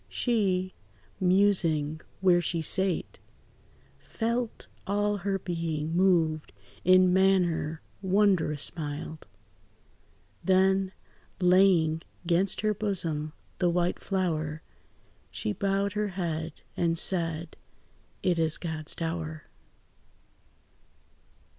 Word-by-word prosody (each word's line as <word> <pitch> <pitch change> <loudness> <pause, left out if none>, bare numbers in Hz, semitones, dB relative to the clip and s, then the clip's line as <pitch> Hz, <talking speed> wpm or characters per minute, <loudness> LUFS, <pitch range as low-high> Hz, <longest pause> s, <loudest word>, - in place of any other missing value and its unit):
She, 190 -6 0 0.5
musing 180 -5 +2 0.2
where 180 -2 +5
she 170 0 -1
sate, 190 +1 +1 0.8
Felt 235 - -3 0.2
all 205 +1 +1
her 195 +1 -1
being 165 -3 -3
moved 165 -4 +2 0.3
in 185 0 +5
manner 180 -4 +2 0.2
wondrous 190 -7 +1
mild; 155 0 -6 1.2
Then, 190 0 +3 0.5
laying 180 -3 +4 0.2
'gainst 180 +3 +1
her 215 0 +1
bosom 165 -7 -2 0.3
the 180 - +3
white 175 +1 0
flower, 160 -5 -2 0.7
She 105 - -3
bowed 195 - 0
her 210 0 0
head, 165 -4 -4
and 165 -1 +1
said, 165 -2 0 0.7
"It 175 -2 +2
is 160 -1 +3
God's 160 -2 -3
dower." 165 -2 -4
180 Hz, 90 wpm, -28 LUFS, 160-195 Hz, 1.2 s, where